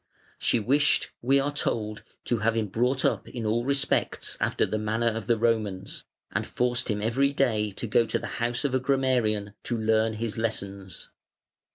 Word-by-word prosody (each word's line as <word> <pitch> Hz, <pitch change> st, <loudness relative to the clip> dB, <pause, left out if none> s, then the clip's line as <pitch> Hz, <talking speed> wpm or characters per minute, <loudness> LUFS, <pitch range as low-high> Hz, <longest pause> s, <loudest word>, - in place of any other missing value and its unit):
She 120 Hz, -, +2 dB
wished, 140 Hz, +7 st, +2 dB
we 135 Hz, +3 st, +4 dB
are 145 Hz, +1 st, -1 dB
told, 110 Hz, -6 st, -1 dB, 0.2 s
to 120 Hz, -, 0 dB
have 110 Hz, +2 st, +1 dB
him 110 Hz, -3 st, 0 dB
brought 125 Hz, +6 st, +1 dB
up -, -, 0 dB
in 120 Hz, -3 st, -5 dB
all 115 Hz, +2 st, +1 dB
respects 140 Hz, +1 st, 0 dB
after -, -, +1 dB
the 110 Hz, -, -2 dB
manner 110 Hz, +2 st, +1 dB
of 115 Hz, 0 st, -5 dB
the 120 Hz, -1 st, +3 dB
Romans, 105 Hz, -4 st, -1 dB, 0.3 s
and -, -, -2 dB
forced 125 Hz, 0 st, 0 dB
him 105 Hz, -1 st, -1 dB
every 135 Hz, +5 st, +2 dB
day 110 Hz, -6 st, +1 dB
to 110 Hz, -, -4 dB
go 115 Hz, +1 st, +3 dB
to -, -, 0 dB
the -, -, -6 dB, 0.2 s
house 120 Hz, +3 st, 0 dB
of 135 Hz, -, 0 dB
a 130 Hz, -, +3 dB
grammarian 125 Hz, -6 st, +1 dB
to 120 Hz, -, -2 dB
learn 110 Hz, 0 st, +2 dB
his 110 Hz, 0 st, -3 dB
lessons. 100 Hz, -4 st, -4 dB
115 Hz, 185 wpm, -27 LUFS, 110-125 Hz, 0.3 s, we